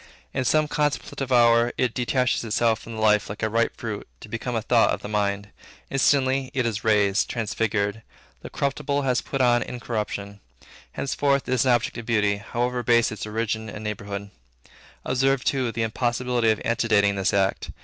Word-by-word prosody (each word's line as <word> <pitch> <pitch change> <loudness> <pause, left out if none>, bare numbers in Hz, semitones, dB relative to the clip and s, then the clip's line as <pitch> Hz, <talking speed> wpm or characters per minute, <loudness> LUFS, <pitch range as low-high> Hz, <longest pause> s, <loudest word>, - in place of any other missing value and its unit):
In 130 -1 -1
some 155 +4 +3
contemplative 145 -2 -2
hour, 120 -1 +5
it 125 -3 +1
detaches 125 0 0
itself 115 0 +1
from 115 - -9
the 110 - -4
life 105 -1 +3
like 105 +2 -7
a 110 - +1
ripe 115 +1 +1
fruit, - - -5
to - - -11
become 115 +1 -4
a 110 - -1
thought 115 -1 +4
of - - -2
the - - -4
mind. 100 -1 -1 0.4
Instantly, 135 -1 +2
it 130 -2 +1
is 115 -2 -2
raised, 105 -2 +2
transfigured; 110 -2 -1 0.4
the - - -8
corruptible 140 0 -1
has 125 -2 +1
put 135 - -3
on 120 -1 +4
incorruption. 105 -4 -4 0.5
Henceforth 140 0 0
it 130 - 0
is 130 0 +2
an 125 - +5
object 120 0 -1
of 115 - -9
beauty, 105 -3 +2
however 120 +4 -2
base 115 -1 +3
its 110 0 -6
origin 110 0 -2
and 105 +1 -8
neighborhood. 100 -1 -5 0.7
Observe, 135 +1 +1
too, 130 -4 0
the 115 0 -2
impossibility 120 +1 0
of 110 - +2
antedating 105 -3 +2
this 95 -1 +1
act. 95 -1 0
115 Hz, 180 wpm, -24 LUFS, 105-125 Hz, 0.7 s, hour